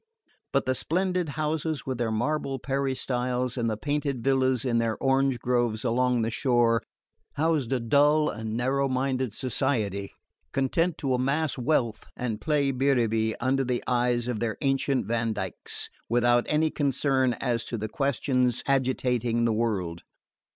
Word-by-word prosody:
But - - +1
the 130 - +2
splendid 180 +4 0
houses 155 0 -1
with 130 -2 -3
their 120 -2 0
marble 135 +5 -1
peristyles, 125 -2 -1
and 120 -3 0
the 110 - -2
painted 145 -1 -2
villas 130 -2 +2
in 120 -2 +2
their 115 -1 0
orange 135 -1 +2
groves 120 -3 0
along 125 0 +2
the 115 - -1
shore, 120 -2 +2 0.5
housed 150 -4 0
a 130 - +2
dull 145 +6 +3
and 110 -2 -3
narrow 135 +3 +1
minded 130 -1 0
society, 110 -5 -1 0.4
content 165 +6 +1
to 135 -2 -1
amass 140 +4 0
wealth 120 -5 0
and 115 -3 -3
play 145 -3 +1
biribi 115 -5 +1
under 135 +2 +1
the 125 -1 -1
eyes 120 -1 +1
of 120 -4 -2
their 110 -1 -2
ancestral 135 -1 +1
Vandykes, 110 -3 -2 0.2
without 120 +1 +3
any 155 +1 +2
concern 135 -2 +1
as 120 -2 -1
to 120 - -4
the 110 0 -3
questions 125 0 0
agitating 125 -3 +1
the 115 - +2
world. 100 -7 -1
125 Hz, 145 wpm, -27 LUFS, 115-135 Hz, 0.5 s, dull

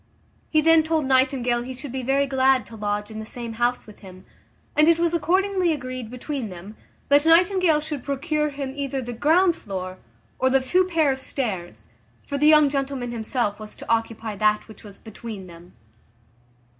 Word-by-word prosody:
He 310 - +3
then 325 +1 +6
told 315 -1 0
Nightingale 260 -2 +2
he 255 +1 -7
should 265 +1 -7
be 260 +1 -3
very 270 +3 +1
glad 265 -3 +2
to 230 - -12
lodge 210 0 -3
in 220 - -7
the 220 - -6
same 235 -1 -6
house 245 +1 +1
with 210 - -15
him; 185 -2 -13 0.5
and 305 +1 +5
it 335 -1 +5
was 340 0 +1
accordingly 370 +2 +1
agreed 255 -4 -6
between 250 -1 -5
them, 185 +4 -10 0.3
that 285 +1 +5
Nightingale 350 -1 +4
should 300 -3 -5
procure 300 +2 -1
him 275 -2 -5
either 275 -1 -3
the 245 -1 -5
ground 330 +8 +3
floor, 185 -2 -6 0.4
or 260 - +3
the 270 +1 +4
two 360 +8 +2
pair 325 -5 +2
of 265 - -3
stairs; 185 - -4 0.4
for 280 - -3
the 300 - +4
young 305 -1 +7
gentleman 275 -3 -3
himself 225 -2 -2
was 215 -1 -9
to - - -11
occupy 225 -1 -1
that 215 +1 +1
which 220 -1 -14
was 200 -2 -12
between 220 -3 -9
them. 175 0 -14
260 Hz, 185 wpm, -23 LUFS, 220-300 Hz, 0.5 s, young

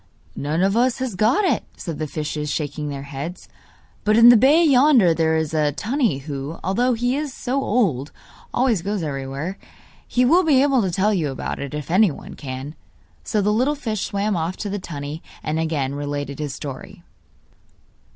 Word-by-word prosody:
'None 155 +5 -1
of 195 +2 +2
us 245 +1 +2
has 260 -4 -3
got 220 - +2
it,' - - +1
said 165 -5 -6
the 155 - -2
fishes, 150 0 -4
shaking 150 0 -3
their 140 -1 -5
heads; 145 +6 -7 0.6
'but 215 +1 +3
in 230 +1 +9
the 240 - +9
bay 280 +9 +5
yonder 260 - +5
there 160 0 +1
is 160 -1 -2
a 150 -2 +1
tunny 230 - 0
who, 140 +2 -6
although 245 +7 +1
he 245 +3 0
is 295 -1 -3
so 260 +2 -2
old, 180 - 0 0.4
always 240 -7 +1
goes 200 0 -2
everywhere. 140 +5 -4 0.5
He 250 0 +2
will 340 +8 +5
be 280 -5 +4
able 275 -3 +3
to 190 - 0
tell 195 +5 +1
you 165 -7 0
about 135 - -4
it, 140 +1 -5
if 150 +1 -5
anyone 185 -4 +2
can.' 135 +1 -7 0.5
So 215 - 0
the 210 +1 +2
little 260 +7 +2
fish 220 -8 -3
swam 200 +1 -1
off 170 +2 -2
to 205 - -4
the 205 - -2
tunny, 150 -2 -6 0.2
and 155 +1 -1
again 150 -4 -1
related 145 0 -4
his 145 -2 -3
story. 140 -3 -8
180 Hz, 185 wpm, -22 LUFS, 145-240 Hz, 0.6 s, in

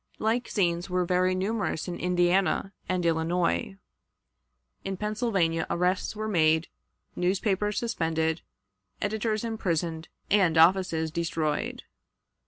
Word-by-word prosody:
Like 230 +2 0
scenes 175 -2 0
were 180 0 +1
very 185 +1 +2
numerous 195 -3 -2
in 175 - -5
Indiana 180 +2 +1 0.2
and 180 -1 0
Illinois. 170 +3 0 1.1
In 195 -1 -4
Pennsylvania 200 -6 0
arrests 180 +4 0
were 215 +1 -3
made, 160 -4 +2 0.5
newspapers 195 +3 0
suspended, 160 -7 -1 0.6
editors 215 +1 -1
imprisoned, 170 -7 -2 0.2
and 185 -5 +4
offices 165 -2 +4
destroyed. 160 -2 -2
180 Hz, 100 wpm, -27 LUFS, 165-205 Hz, 1.1 s, and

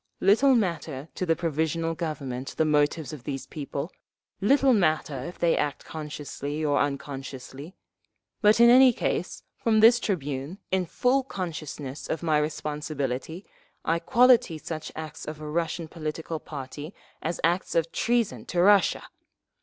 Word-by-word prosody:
Little 255 +8 +5
matter 165 - -2
to 185 - -3
the 165 - +3
Provisional 165 0 -1
Government 135 -6 -4
the 160 - +3
motives 150 -1 +1
of 140 -5 -9
these 135 -1 -4
people, 145 +2 -5 0.5
little 270 +5 +4
matter 155 - +1
if 175 - -8
they 170 -1 +2
act 145 -1 -2
consciously 150 -1 -5
or 145 -1 +2
unconsciously; 140 +2 -5 0.7
but 210 +1 +5
in 235 - +8
any 255 0 +8
case, - - -2
from 225 -3 +2
this 230 +2 +7
tribune, 145 - -3
in 185 -2 +1
full 250 +9 +2
consciousness 155 - -6
of 160 - -2
my 155 -2 +3
responsibility, 150 +1 -3 0.4
I 165 +1 +2
quality 240 -6 +4
such 155 +1 -6
acts 155 -1 -7
of 155 0 -6
a 155 - -7
Russian 165 +1 -2
political 160 0 -5
party 145 +3 -8 0.3
as 165 +1 -3
acts 175 +3 +1
of 165 0 +1
treason 235 -2 0
to 175 - -1
Russia! 200 +2 +4
160 Hz, 145 wpm, -26 LUFS, 145-185 Hz, 0.7 s, in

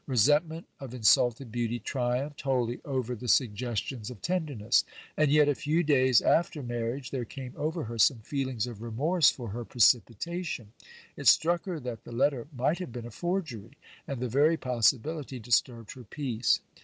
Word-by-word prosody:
Resentment 150 +6 +2
of 130 -3 -8
insulted 120 +1 +3
beauty 120 0 -1
triumphed 125 +4 -2
wholly 125 -3 -1
over 130 -4 -2
the 125 +1 -7
sugges 120 -2 +1
ti 135 - -4
)ns 110 -2 -7
of 125 -5 -10
tenderness. 145 - 0 0.3
And 155 -1 +2
yet, 150 0 +5
a 145 - +3
few 155 +5 0
days 130 -5 +4
after 160 -3 +1
marriage, 120 +2 -4
there 130 -3 -2
came 130 +1 -8
over 160 +2 -2
her 115 0 -6
some 120 +4 +5
feelings 130 -2 -2
of 115 -4 -9
remorse 140 +8 +2
for 120 -4 -5
her 120 +4 -5
precipitation; 120 - 0 0.4
it - - -4
struck 170 +1 +4
her 180 -4 -4
that 120 -3 -6
the - - -11
letter 135 +1 0
might 145 +6 0
have 180 -8 -6
been 120 -1 -7
a 120 - -8
forgery; 145 - -4 0.3
and 140 -5 -4
the 125 - -2
very 145 +7 +3
possibility 130 +3 0
disturbed 115 -1 0
her 125 - -12
peace. 120 0 0
125 Hz, 175 wpm, -29 LUFS, 120-150 Hz, 0.4 s, yet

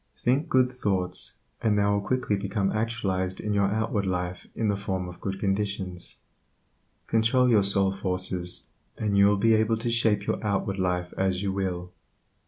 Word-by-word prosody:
Think 135 +7 +1
good 130 -1 +3
thoughts, 95 -7 -2 0.3
and 105 -2 +2
they 100 - +3
will 100 0 +2
quickly 125 -1 0
become 100 0 -1
actualized 100 -5 -1
in 105 - -2
your 100 -1 +3
outward 105 -1 0
life 90 -1 -3
in 110 - 0
the 100 - +2
form 95 -2 -3
of 90 - -10
good 95 -1 -3
conditions. 95 -3 -2 0.9
Control 120 +3 +3
your 110 -4 +5
soul 100 -1 +2
forces, 90 -2 -2 0.3
and 105 -2 0
you 100 0 +6
will 100 0 +3
be 115 +3 +4
able 110 +1 +3
to 115 +1 -2
shape 110 -3 +2
your - - -2
outward 100 -1 -1
life 90 -1 -1
as 95 0 +1
you 95 -1 -1
will. 90 -2 -3
100 Hz, 175 wpm, -27 LUFS, 95-110 Hz, 0.9 s, you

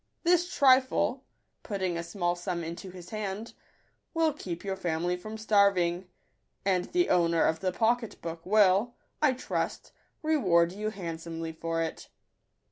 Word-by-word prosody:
This 355 +1 +3
trifle," 260 -1 +3 0.4
putting 190 -5 -2
a 170 - -2
small 175 0 -1
sum 175 -1 -3
into 170 +3 -6
his 180 -1 -11
hand, 215 +1 -4 0.3
" - - -43
will 325 -2 +3
keep 175 - -6
your 195 -1 -2
family 175 -1 -1
from 215 +5 -7
starving; 195 -5 +2 0.6
and 185 -2 +2
the 350 - +1
owner 170 -1 +3
of 160 0 +1
the 185 +1 0
pocket 230 +3 0
book 165 0 -6
will, 205 +3 +4 0.3
I 295 -4 +4
trust, 255 - -3 0.3
re 315 0 +2
ward 170 - +3
you 210 +3 -3
handsomely 165 -4 -5
for 165 +1 -2
it." 160 - -6
190 Hz, 150 wpm, -29 LUFS, 170-220 Hz, 0.6 s, will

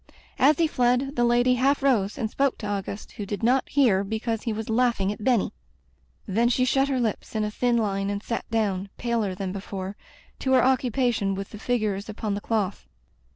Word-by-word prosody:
As 280 +3 +5
he 335 - +3
fled, 255 0 +1
the 240 - +2
lady 240 +1 +4
half 270 +3 +2
rose 225 -7 +2
and 220 - -1
spoke 275 +4 0
to 210 - -5
Auguste, 200 0 -4
who 205 - -6
did 205 +2 -4
not 255 +3 +2
hear 235 -9 +3
because 220 +2 -2
he 230 - -2
was 220 0 -4
laughing 225 -4 +1
at 210 - -7
Benny. 240 -4 +2 0.7
Then 230 +5 +2
she 255 +1 +2
shut 270 +2 +2
her 270 -2 0
lips 225 -1 -2
in 215 - +1
a 210 - -2
thin 240 +2 +1
line 195 -3 0
and 205 +1 -3
sat 230 - -4
down, 200 -4 -1
paler 230 -5 -1
than 190 -1 -4
before, 195 0 -5 0.4
to 265 - 0
her 255 -1 +5
occupation 245 -6 +1
with 195 0 -6
the 210 - -9
figures 215 -4 -1
upon 215 -1 -3
the 200 - -3
cloth. 205 -4 -2
225 Hz, 200 wpm, -25 LUFS, 200-250 Hz, 0.7 s, As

